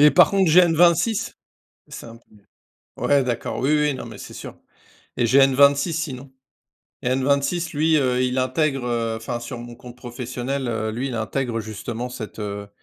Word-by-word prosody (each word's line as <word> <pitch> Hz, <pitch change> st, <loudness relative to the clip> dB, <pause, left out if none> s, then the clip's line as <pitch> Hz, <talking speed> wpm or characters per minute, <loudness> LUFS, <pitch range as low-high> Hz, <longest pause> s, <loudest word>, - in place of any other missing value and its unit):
Par 180 Hz, -, +7 dB
contre, 195 Hz, -4 st, +2 dB
j'ai 180 Hz, -, +8 dB
N26, 175 Hz, +5 st, +3 dB, 0.5 s
c'est -, -, -9 dB
un 115 Hz, 0 st, -11 dB, 0.6 s
peu -, -, -16 dB
ouais, 140 Hz, -2 st, +3 dB
d'accord. 120 Hz, -2 st, -3 dB
Oui 135 Hz, +3 st, 0 dB
oui, 150 Hz, -2 st, +1 dB
non 130 Hz, -, -7 dB
mais, 110 Hz, -3 st, -10 dB
c'est -, -, -10 dB
sûr. -, -, -9 dB, 0.6 s
Et 120 Hz, -, +2 dB
j'ai 135 Hz, +4 st, +5 dB
N26 140 Hz, +4 st, +4 dB
sinon. 140 Hz, -5 st, -5 dB, 0.7 s
Et -, -, -1 dB
N26 140 Hz, +6 st, 0 dB
lui, 160 Hz, +1 st, +3 dB
heu, 125 Hz, -2 st, +1 dB
il 125 Hz, 0 st, -1 dB
intègre, 135 Hz, +1 st, 0 dB
heu, 115 Hz, -2 st, -1 dB
enfin 120 Hz, +1 st, -5 dB
sur 120 Hz, +1 st, -7 dB
mon 120 Hz, 0 st, -9 dB
compte 125 Hz, 0 st, -12 dB
professionnel, 125 Hz, +1 st, -4 dB
heu, 110 Hz, -1 st, -2 dB
lui, 125 Hz, +4 st, -3 dB
il 125 Hz, -, -5 dB
intègre 115 Hz, +1 st, -2 dB
justement 110 Hz, +3 st, -5 dB
cette, 110 Hz, -3 st, -8 dB
heu 100 Hz, 0 st, -5 dB
130 Hz, 180 wpm, -22 LUFS, 120-145 Hz, 0.7 s, j'ai